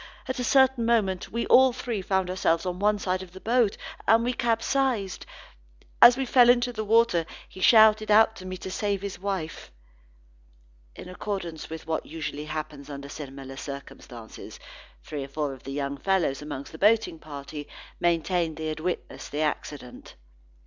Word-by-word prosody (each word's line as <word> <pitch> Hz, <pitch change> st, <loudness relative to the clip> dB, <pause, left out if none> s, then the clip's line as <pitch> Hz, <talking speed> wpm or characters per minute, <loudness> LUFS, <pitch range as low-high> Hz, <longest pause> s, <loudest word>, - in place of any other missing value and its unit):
At 260 Hz, -, -3 dB
a -, -, -1 dB
certain 265 Hz, -1 st, +4 dB
moment 215 Hz, -6 st, +1 dB
we 235 Hz, +1 st, -2 dB
all 260 Hz, 0 st, +6 dB
three 235 Hz, -4 st, -4 dB
found 190 Hz, -1 st, 0 dB
ourselves 170 Hz, -2 st, +1 dB
on 180 Hz, 0 st, -3 dB
one 210 Hz, +1 st, +2 dB
side 185 Hz, -2 st, -2 dB
of 185 Hz, -2 st, -11 dB
the 190 Hz, -, -10 dB
boat, 230 Hz, -1 st, +1 dB, 0.3 s
and 225 Hz, +2 st, +5 dB
we 245 Hz, +1 st, 0 dB
capsized. 235 Hz, -3 st, 0 dB, 0.7 s
As 240 Hz, +1 st, +9 dB
we 270 Hz, -, -1 dB
fell 245 Hz, -1 st, +5 dB
into 245 Hz, 0 st, +3 dB
the 220 Hz, -1 st, -3 dB
water, 225 Hz, -5 st, +3 dB, 0.2 s
he -, -, -13 dB
shouted 215 Hz, 0 st, +6 dB
out 220 Hz, +1 st, +5 dB
to 185 Hz, -, -10 dB
me 185 Hz, 0 st, -5 dB
to 190 Hz, -, -7 dB
save 200 Hz, -1 st, -2 dB
his 200 Hz, -3 st, -5 dB
wife." 190 Hz, -5 st, -4 dB, 1.2 s
In -, -, -10 dB
accordance 180 Hz, -3 st, -5 dB
with 160 Hz, 0 st, -7 dB
what 160 Hz, -1 st, -3 dB
usually 150 Hz, -1 st, -5 dB
happens 155 Hz, -2 st, -6 dB
under 140 Hz, 0 st, -7 dB
similar 135 Hz, -2 st, -8 dB
circumstances, 135 Hz, -5 st, -9 dB, 0.4 s
three 145 Hz, -3 st, -5 dB
or -, -, -7 dB
four 145 Hz, 0 st, -3 dB
young 140 Hz, 0 st, -3 dB
fellows 180 Hz, -9 st, 0 dB
among 145 Hz, -2 st, -6 dB
the 160 Hz, +2 st, -12 dB
boating 215 Hz, -5 st, +3 dB
party, 145 Hz, -1 st, -8 dB, 0.3 s
maintained 170 Hz, -1 st, 0 dB
that -, -, -7 dB
they -, -, -2 dB
had 155 Hz, 0 st, -4 dB
witnessed 180 Hz, +2 st, -5 dB
the 150 Hz, -, -2 dB
accident. 145 Hz, -4 st, -4 dB
185 Hz, 170 wpm, -26 LUFS, 155-220 Hz, 1.2 s, As